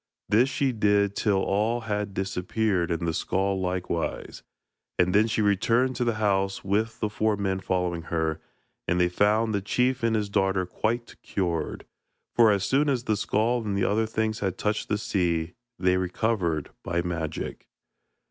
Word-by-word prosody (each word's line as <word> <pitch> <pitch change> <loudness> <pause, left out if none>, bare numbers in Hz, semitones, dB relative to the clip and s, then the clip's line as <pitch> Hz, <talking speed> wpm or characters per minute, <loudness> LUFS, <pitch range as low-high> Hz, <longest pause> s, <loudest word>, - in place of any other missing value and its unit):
This 115 +6 +4
she 135 0 +1
did 100 -3 +2
till 100 -3 +1
all 110 +4 +1
had 105 -2 -3
disappeared 95 -1 0
and 85 0 -1
the 80 - 0
skull 95 +3 0
likewise, 90 -2 -3 0.6
and 90 0 +3
then 105 +2 +5
she 110 -1 0
returned 115 +6 +2
to 125 - +1
the 120 -2 0
house 100 -2 0
with 110 +4 0
the 105 - +2
four 110 0 0
men 95 -1 -1
following 90 -2 -1
her, 80 -1 -1 0.5
and 90 - +1
they 90 0 +3
found 105 +4 +2
the 100 - 0
chief 125 +5 +1
and 115 -1 +2
his 105 -1 0
daughter 95 -2 +1
quite 115 +6 -3
cured, 85 -5 -2 0.5
for 115 -2 +6
as 100 -2 +1
soon 140 +7 +2
as 130 -4 0
the 110 -4 +1
skull 110 +3 0
and 100 -2 -2
the 100 - +1
other 110 +2 +1
things 110 0 -1
had 95 -2 -2
touched 105 0 -1
the 105 - +1
sea, 85 -5 -1 0.2
they 90 0 +2
recovered 90 -4 -1
by 85 0 -1
magic. 85 -3 -4
100 Hz, 170 wpm, -26 LUFS, 90-110 Hz, 0.6 s, for